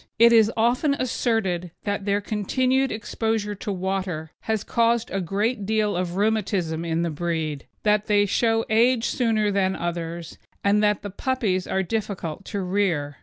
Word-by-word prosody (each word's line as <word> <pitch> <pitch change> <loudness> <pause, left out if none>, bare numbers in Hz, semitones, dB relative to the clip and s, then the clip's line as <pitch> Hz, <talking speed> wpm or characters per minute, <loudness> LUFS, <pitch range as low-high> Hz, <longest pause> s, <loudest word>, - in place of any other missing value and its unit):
It 235 +1 +7
is 225 -1 +6
often 250 +6 +2
asserted 225 -9 -1
that 200 -1 -2
their 205 0 +1
continued 255 +6 0
exposure 220 -1 -2
to 205 +1 -5
water 185 -4 -3
has 220 -2 -2
caused 235 0 +1
a 195 - -1
good 200 +4 -1
deal 215 -2 +1
of 175 -1 -2
rheumatism 195 -6 0
in 165 0 -1
the 170 - -1
breed, 155 -2 -3 0.2
that 210 0 +2
they 205 -1 +4
show 225 +2 +1
age 235 +2 +3
sooner 220 -4 +1
than 190 -1 +1
others, 170 -1 -5 0.2
and 205 +1 +3
that 210 -1 +2
the 205 - -5
puppies 205 -5 -1
are 190 - 0
difficult 195 -3 -4
to 200 -2 -3
rear. 180 -7 0
205 Hz, 160 wpm, -24 LUFS, 180-225 Hz, 0.2 s, It